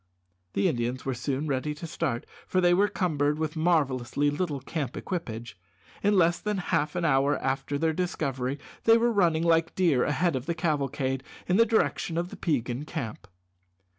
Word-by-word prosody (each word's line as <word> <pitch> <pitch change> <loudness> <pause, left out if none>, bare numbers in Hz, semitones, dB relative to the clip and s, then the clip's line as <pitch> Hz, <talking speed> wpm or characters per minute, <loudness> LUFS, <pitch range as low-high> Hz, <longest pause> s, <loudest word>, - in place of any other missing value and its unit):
The 100 - +2
Indians 120 +2 -2
were 135 - 0
soon 135 +4 -2
ready 150 +1 -1
to 160 - -7
start, 125 -6 -2 0.2
for 185 - +1
they 175 -1 +4
were 200 +3 +4
cumbered 150 -7 0
with 155 0 -2
marvellously 145 -4 +1
little 145 -2 -2
camp 140 -1 -4
equipage. 120 - -5 0.4
In 205 0 +3
less 170 -1 +4
than 210 -1 -2
half 155 -4 0
an 175 -1 0
hour 140 -1 +3
after 135 +2 -1
their 160 +2 +1
discovery 135 -6 -2 0.3
they 225 0 +7
were 235 +1 +2
running 170 -6 +2
like 165 -1 +2
deer 165 -9 +3
ahead 160 +1 +1
of 130 +1 -4
the 170 - 0
cavalcade 140 -5 -1 0.3
in 180 - +3
the 230 +1 +5
direction 210 -6 +1
of 175 +1 -1
the - - -8
Peigan 130 -4 -1
camp. 115 -10 -5
150 Hz, 175 wpm, -27 LUFS, 135-175 Hz, 0.4 s, they